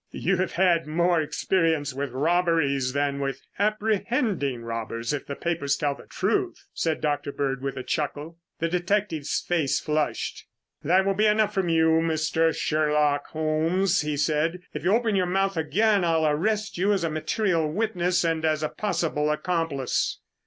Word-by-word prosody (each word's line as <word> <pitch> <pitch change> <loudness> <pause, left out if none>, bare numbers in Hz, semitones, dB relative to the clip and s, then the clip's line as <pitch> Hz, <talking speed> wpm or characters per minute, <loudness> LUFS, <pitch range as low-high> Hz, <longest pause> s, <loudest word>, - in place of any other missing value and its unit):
"You 190 +2 0
have 185 0 -1
had 170 -3 +2
more 170 +1 +2
experience 160 -2 0
with 140 +1 -3
robberies 145 -2 +1
than 140 0 0
with 135 -1 -2 0.2
apprehending 210 - 0
robbers 115 +1 -3
if 145 - -4
the 140 - -4
papers 145 -5 -1
tell 145 -1 0
the - - -14
truth," - - -1
said 160 -1 -1
Dr. 145 -1 -1
Bird 135 -2 -2
with 135 0 -4
a 130 - -4
chuckle. 150 +3 -3 0.2
The 165 - 0
detective's 175 -3 -1
face 150 -6 +1
flushed. 150 0 -2 0.4
"That 185 +5 +3
will 195 - +2
be 210 +2 +2
enough 210 0 +2
from 190 -4 0
you, 160 0 +3
Mr. 160 0 +1
Sherlock 150 -2 +1
Holmes," 165 +5 +1
he 150 -1 -2
said. 155 +4 0
"If - - -5
you 180 - +2
open 225 -1 +2
your 185 -2 +2
mouth 195 +1 0
again, 200 +5 +2
I'll 165 -2 +2
arrest 200 +7 0
you 200 +3 +3
as 195 - 0
a 165 - 0
material 160 0 0
witness 180 -3 0
and 165 -1 0
as 155 -1 +1
a 155 - 0
possible 165 -7 -1
accomplice." 150 -4 -1
165 Hz, 165 wpm, -25 LUFS, 150-185 Hz, 0.4 s, That